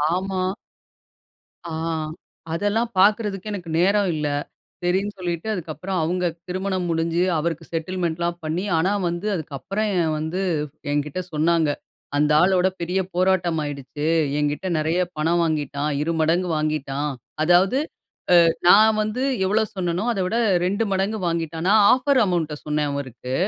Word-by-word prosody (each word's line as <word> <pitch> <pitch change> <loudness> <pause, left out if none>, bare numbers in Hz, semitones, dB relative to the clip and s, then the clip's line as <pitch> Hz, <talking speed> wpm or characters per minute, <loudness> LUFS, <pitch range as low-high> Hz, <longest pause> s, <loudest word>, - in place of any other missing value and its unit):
ஆமா. 190 0 -2 1.2
ஆ, 170 - -6 0.8
அதெல்லாம் 205 +6 0
பாக்குறதுக்கு 205 0 +2
எனக்கு 180 -4 -6
நேரம் 200 +2 +3
இல்ல. 150 -1 -1 0.6
சரின்னு 190 +4 0
சொல்லிட்டு 175 +2 -3
அதுக்கப்பறம் 180 0 -3
அவுங்க 180 +3 0 0.2
திருமணம் 185 0 -2
முடிஞ்சு 165 +1 +1
அவருக்கு 165 +1 -2
செட்டில்மென்ட்லாம் 170 0 -2
பண்ணி, 160 +4 -2
ஆனா 170 +4 +2 0.2
வந்து 175 +4 -4
அதுக்கப்பறம் 185 - -3 0.2
வந்து 160 +4 -3 0.5
என்கிட்ட 145 +4 -1
சொன்னாங்க. 160 +1 +2 0.5
அந்த 150 +1 +2
ஆளோட 185 +1 +4
பெரிய 180 +3 0
போராட்டமாயிடுச்சு. 160 -6 0 0.3
என்கிட்ட 150 +4 -1
நெறைய 160 +3 +1 0.2
பணம் 165 +3 +1
வாங்கிட்டான். 150 -2 -1
இரு 165 - 0
மடங்கு 170 +3 +2
வாங்கிட்டான். 150 -1 -1 0.3
அதாவது 180 +7 +4 0.7
அ - - +4 0.2
நான் 215 +4 +7
வந்து 215 +4 -2 0.2
எவ்ளோ 210 +4 +2
சொன்னேனோ, 180 0 -1
அதை 195 - -2
விட 220 +6 -1 0.3
2 200 +4 +1
மடங்கு 195 +3 0
வாங்கிட்டான். 165 0 -2
நான் 215 0 +6
ஆஃபர் 260 +1 +2
அமௌண்ட் 170 -5 -1
சொன்னேன் 150 -1 0
அவருக்கு. 130 -2 -5
175 Hz, 125 wpm, -23 LUFS, 155-190 Hz, 1.2 s, நான்